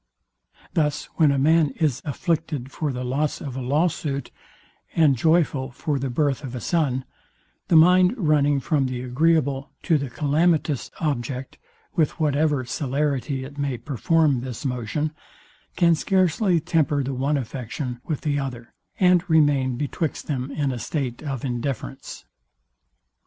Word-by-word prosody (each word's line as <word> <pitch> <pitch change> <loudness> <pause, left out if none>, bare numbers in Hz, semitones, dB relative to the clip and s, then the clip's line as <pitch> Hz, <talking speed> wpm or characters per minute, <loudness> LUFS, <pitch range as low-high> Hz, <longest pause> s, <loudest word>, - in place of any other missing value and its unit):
Thus 150 -2 0
when 155 -4 +5
a 140 - +1
man 155 +2 +4
is 145 -7 +1
afflicted 150 -3 -2
for 150 0 -2
the 125 0 -4
loss 140 +4 -1
of 135 -4 -6
a 130 - -3
law 145 +7 +2
suit, 140 -5 -4 0.6
and 155 -5 +5
joyful 150 -2 +2
for 140 +3 -2
the 135 0 -2
birth 140 +2 0
of 130 -2 -6
a - - -3
son, 135 -4 0 0.6
the - - +3
mind 180 +5 +6
running 145 - +3
from 140 -2 +1
the 125 -1 -4
agreeable 140 +1 +1
to 160 -4 +3
the 140 -2 -4
calamitous 150 +1 +1
object, 130 -3 -3 0.3
with 160 0 0
whatever 150 -3 +1
celerity 135 +2 -1
it 140 +2 -10
may 140 -3 -1
perform 145 +1 +1
this 125 +2 -6
motion, 125 +4 -2 0.6
can 170 -2 +4
scarcely 185 +2 +2
temper 145 -3 +1
the 135 +1 -3
one 140 +3 0
affection 125 0 -5
with 155 -4 -3
the 145 -2 0
other, 125 -4 -6 0.3
and 180 -1 +4
remain 145 -5 +3
betwixt 145 +3 -3
them 135 -3 -3
in 140 -1 -1
a 125 - -4
state 125 0 -3
of 135 -4 -4
indifference. 130 +1 -4
145 Hz, 145 wpm, -24 LUFS, 130-155 Hz, 0.6 s, mind